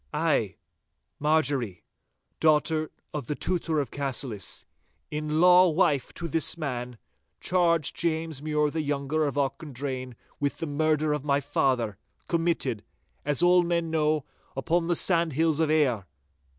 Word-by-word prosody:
'I, -, -, +1 dB, 0.6 s
Marjorie, 145 Hz, -, 0 dB, 0.6 s
daughter 155 Hz, 0 st, +2 dB, 0.2 s
of 145 Hz, -6 st, -4 dB
the 150 Hz, -, -2 dB
Tutor 165 Hz, -3 st, -1 dB
of 140 Hz, -5 st, -3 dB
Cassillis, 130 Hz, -7 st, -4 dB, 0.5 s
in 150 Hz, +1 st, -2 dB
law 180 Hz, +1 st, +7 dB
wife 150 Hz, -5 st, +1 dB
to 170 Hz, -, -4 dB
this 165 Hz, +1 st, +1 dB
man, 125 Hz, -6 st, -4 dB, 0.4 s
charge 170 Hz, -5 st, +2 dB
James 160 Hz, -3 st, -1 dB
Mure 150 Hz, -1 st, 0 dB
the 160 Hz, -, -1 dB
younger 145 Hz, +1 st, -1 dB
of 140 Hz, -, -3 dB
Auchendrayne 135 Hz, -3 st, -3 dB, 0.2 s
with 145 Hz, -1 st, -1 dB
the -, -, -3 dB
murder 155 Hz, 0 st, +1 dB
of 150 Hz, -2 st, -3 dB
my 140 Hz, -1 st, +2 dB
father, 130 Hz, -7 st, 0 dB, 0.3 s
committed, 165 Hz, -10 st, 0 dB, 0.4 s
as 145 Hz, +3 st, +1 dB
all 180 Hz, 0 st, +6 dB
men 170 Hz, -1 st, -1 dB
know, 155 Hz, -2 st, +1 dB, 0.3 s
upon 165 Hz, +5 st, 0 dB
the 175 Hz, -, +2 dB
sandhills 165 Hz, -3 st, +2 dB
of 160 Hz, -2 st, +2 dB
Ayr. 130 Hz, -, +2 dB
150 Hz, 135 wpm, -27 LUFS, 140-165 Hz, 0.6 s, law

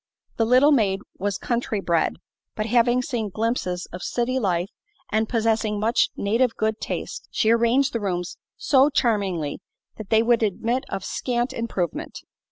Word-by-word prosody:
The 225 Hz, -, +2 dB
little 255 Hz, +5 st, +6 dB
maid 200 Hz, -8 st, +2 dB, 0.2 s
was 200 Hz, +1 st, -1 dB
country 235 Hz, -3 st, -2 dB
bred, 170 Hz, -4 st, +1 dB, 0.4 s
but 215 Hz, -, -2 dB
having 240 Hz, +2 st, +3 dB
seen 235 Hz, -7 st, -2 dB
glimpses 200 Hz, -4 st, -2 dB
of 180 Hz, -, -6 dB
city 250 Hz, +5 st, -1 dB
life 180 Hz, -4 st, 0 dB, 0.4 s
and 220 Hz, +1 st, +1 dB
possessing 220 Hz, -2 st, +1 dB
much 225 Hz, +3 st, +2 dB
native 230 Hz, +4 st, +1 dB
good 220 Hz, 0 st, -1 dB
taste, -, -, -5 dB
she 220 Hz, -, +2 dB
arranged 235 Hz, +4 st, +3 dB
the 230 Hz, -, 0 dB
rooms 180 Hz, -4 st, -3 dB, 0.2 s
so 275 Hz, 0 st, +4 dB
charmingly 200 Hz, -, 0 dB, 0.4 s
that 215 Hz, -3 st, -8 dB
they 220 Hz, 0 st, +4 dB
would 235 Hz, 0 st, +3 dB
admit 230 Hz, +4 st, 0 dB
of 195 Hz, -2 st, -4 dB
scant 240 Hz, 0 st, -2 dB
improvement. 200 Hz, -7 st, -3 dB
225 Hz, 155 wpm, -24 LUFS, 200-240 Hz, 0.4 s, little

